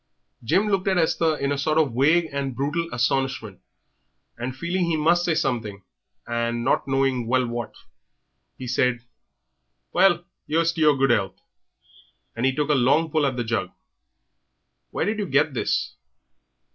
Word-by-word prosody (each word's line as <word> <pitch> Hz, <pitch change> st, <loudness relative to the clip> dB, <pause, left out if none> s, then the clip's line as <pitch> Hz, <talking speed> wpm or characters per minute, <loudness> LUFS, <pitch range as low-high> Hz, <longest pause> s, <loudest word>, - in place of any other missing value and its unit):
Jim 190 Hz, -, +2 dB
looked 195 Hz, -2 st, 0 dB
at 190 Hz, -1 st, +2 dB
Esther 160 Hz, -1 st, +1 dB
in 140 Hz, 0 st, -1 dB
a 140 Hz, -, -1 dB
sort 155 Hz, +2 st, 0 dB
of 150 Hz, -6 st, +2 dB
vague 155 Hz, +7 st, +3 dB
and 135 Hz, -2 st, -3 dB
brutal 150 Hz, +6 st, -2 dB
astonishment, 125 Hz, -4 st, -1 dB, 0.7 s
and 125 Hz, +2 st, -5 dB
feeling 175 Hz, +5 st, -1 dB
he 165 Hz, -1 st, 0 dB
must 170 Hz, +3 st, +3 dB
say 170 Hz, -2 st, +1 dB
something, 110 Hz, -9 st, -2 dB, 0.4 s
and 120 Hz, 0 st, -2 dB
not -, -, +1 dB
knowing 135 Hz, -3 st, 0 dB
well 130 Hz, +1 st, +2 dB
what, 120 Hz, -1 st, -5 dB, 0.8 s
he 130 Hz, -, -7 dB
said 125 Hz, -1 st, 0 dB, 0.9 s
"Well, 175 Hz, -2 st, +3 dB, 0.2 s
'ere's 165 Hz, +2 st, +2 dB
to 165 Hz, -, -4 dB
your 150 Hz, -2 st, +5 dB
good 135 Hz, -1 st, +3 dB
health!" 100 Hz, -6 st, 0 dB, 1.0 s
and 120 Hz, +3 st, 0 dB
he 135 Hz, -, 0 dB
took 150 Hz, 0 st, -1 dB
a -, -, +5 dB
long 145 Hz, +5 st, +2 dB
pull 150 Hz, -2 st, +2 dB
at 130 Hz, -2 st, -3 dB
the 120 Hz, -, -1 dB
jug. 110 Hz, -5 st, -2 dB, 1.2 s
"Where -, -, -2 dB
did 215 Hz, +1 st, -1 dB
you 205 Hz, -, -2 dB
get 145 Hz, +1 st, +2 dB
this?" 125 Hz, -, -1 dB
140 Hz, 160 wpm, -24 LUFS, 120-160 Hz, 1.2 s, your